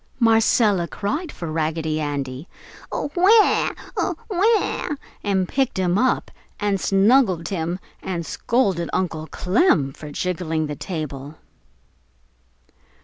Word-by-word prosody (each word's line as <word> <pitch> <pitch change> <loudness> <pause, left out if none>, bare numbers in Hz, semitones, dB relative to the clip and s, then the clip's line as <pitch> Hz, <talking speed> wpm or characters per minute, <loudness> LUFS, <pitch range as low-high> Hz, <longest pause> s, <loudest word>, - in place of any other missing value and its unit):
Marcella 225 -5 +3
cried 295 - -3
for 170 -2 -6
Raggedy 155 0 -1
Andy, 140 0 -4 0.4
"AWAA! 380 +8 +3 0.2
AWAA!" 405 -6 0 0.3
and 190 -2 +1
picked 265 -1 0
him 180 -1 +1
up 255 +6 +1 0.3
and 205 -2 0
snuggled 195 -4 +3
him 175 -2 -2 0.2
and 170 -3 -3
scolded 195 -8 0
Uncle 160 -4 -2
Clem 180 - +2
for 150 - -9
jiggling 165 -1 -2
the 150 -1 -4
table. 150 -4 -6
185 Hz, 100 wpm, -22 LUFS, 160-230 Hz, 0.4 s, Marcella